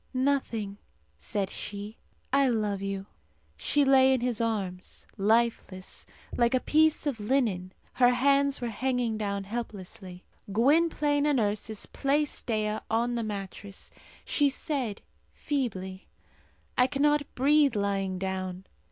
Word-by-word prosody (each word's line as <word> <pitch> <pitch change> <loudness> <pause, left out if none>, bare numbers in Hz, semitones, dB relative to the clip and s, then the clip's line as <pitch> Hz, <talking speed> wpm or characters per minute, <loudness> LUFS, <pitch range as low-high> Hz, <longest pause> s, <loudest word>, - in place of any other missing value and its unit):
"Nothing," 240 -7 0 0.4
said 195 - -2
she 205 +2 -6 0.3
"I 275 -1 +4
love 210 -4 0
you!" 195 -1 -3 0.5
She 290 -1 +2
lay 265 -1 +6
in 255 - -2
his 245 -2 0
arms, 195 -5 -3
lifeless, 215 -3 0 0.3
like 235 +1 +3
a - - +3
piece 310 +3 +3
of 275 -6 -1
linen; 210 -6 0 0.2
her 245 -1 +5
hands 275 +2 +3
were 240 - -1
hanging 245 0 -1
down 200 -1 -2
helplessly. 195 -4 -7 0.3
Gwynplaine 290 +4 +3
and 290 -4 +3
Ursus 210 0 -2
placed 290 +1 -1
Dea 215 -2 0
on 235 +2 +1
the 235 - -1
mattress. 200 -1 -6 0.3
She 290 -2 +3
said, 265 -6 -2 0.3
feebly, 195 -10 -3 0.7
"I 250 - +4
cannot 290 +1 +2
breathe 285 -1 +4
lying 195 -2 0
down." 185 0 -4
230 Hz, 125 wpm, -28 LUFS, 200-275 Hz, 0.7 s, lay